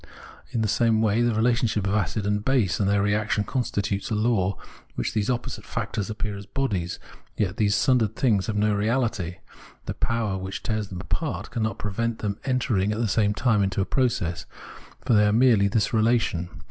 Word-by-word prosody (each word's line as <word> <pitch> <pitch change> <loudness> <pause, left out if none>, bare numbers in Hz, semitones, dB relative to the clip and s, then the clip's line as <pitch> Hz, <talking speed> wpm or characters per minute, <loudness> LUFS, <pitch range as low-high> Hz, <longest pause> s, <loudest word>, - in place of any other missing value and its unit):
In 115 - -1
the - - +1
same 115 +1 +2
way, 110 +1 +2
the 120 -2 +2
relationship 115 -2 +1
of 100 - 0
acid 105 0 0
and 105 0 0
base 110 - +1
and 100 - +2
their 100 0 +2
reaction 105 0 +1
constitute 100 -5 -2
a 110 - 0
law 105 -3 +1 0.4
in - - -33
which - - -2
these 105 0 0
opposite 125 -1 -3
factors 100 -3 -3
appear 105 -1 -3
as 100 0 -9
bodies. 100 -10 -2 0.4
Yet 100 -1 -1
these 100 -2 +2
sundered 115 -5 +2
things 105 -7 +2
have 110 - -2
no 105 0 +2
reaUty; 105 -4 0 0.5
the - - -3
power 110 -5 -1
which 95 +1 -6
tears 110 -3 -1
them 90 -2 -7
apart - - -3
cannot 110 -1 -2
prevent 115 +3 -2
them 100 -1 -3
entering 120 -7 +1
at 105 - -2
the 120 - +1
same 105 0 +1
time 115 -4 +2
into 95 0 0
a 95 - +2
process; 115 -10 -1 0.6
for - - +3
they 105 -1 +5
are - - +3
merely 115 -3 +4
this 105 +2 0
relation. 110 -6 +1
105 Hz, 195 wpm, -25 LUFS, 100-115 Hz, 0.6 s, they